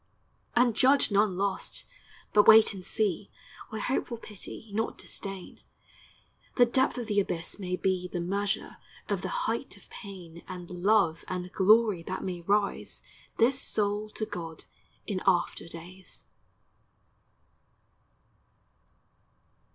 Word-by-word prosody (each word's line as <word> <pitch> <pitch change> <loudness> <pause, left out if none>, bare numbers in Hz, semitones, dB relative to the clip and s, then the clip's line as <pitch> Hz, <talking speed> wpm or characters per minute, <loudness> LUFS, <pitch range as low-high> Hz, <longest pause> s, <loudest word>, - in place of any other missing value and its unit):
And 240 -2 +4
judge 265 0 +4
none 200 -2 +3
lost; 195 0 -1 0.5
but 210 - +6
wait 220 -1 +8
and 190 -2 -8
see, 205 -1 -1 0.4
With 220 -1 -4
hopeful 245 -2 -1
pity, 215 0 -8
not 225 +2 -1
disdain; 195 -2 -7 0.9
The 245 - +6
depth 260 +2 +2
of 245 - -3
the 210 -2 +1
abyss 175 -1 -3
may 180 -2 -2
be 185 -1 0
The 180 0 -4
measure 195 +3 -2 0.3
of - - 0
the - - -3 0.2
height - - -2
of - - -18
pain 180 -5 -10
And 180 -2 -7
love 180 -2 +2
and 180 0 -4
glory 210 -1 +5
that 185 +3 -5
may 180 -2 -4
raise 200 +3 0 0.3
This 255 +3 +3
soul 210 0 -1
to 215 - -2
God 170 -6 -7 0.4
in 190 -3 -2
after 175 -2 +2
days! 175 +3 -10
200 Hz, 125 wpm, -29 LUFS, 180-215 Hz, 0.9 s, wait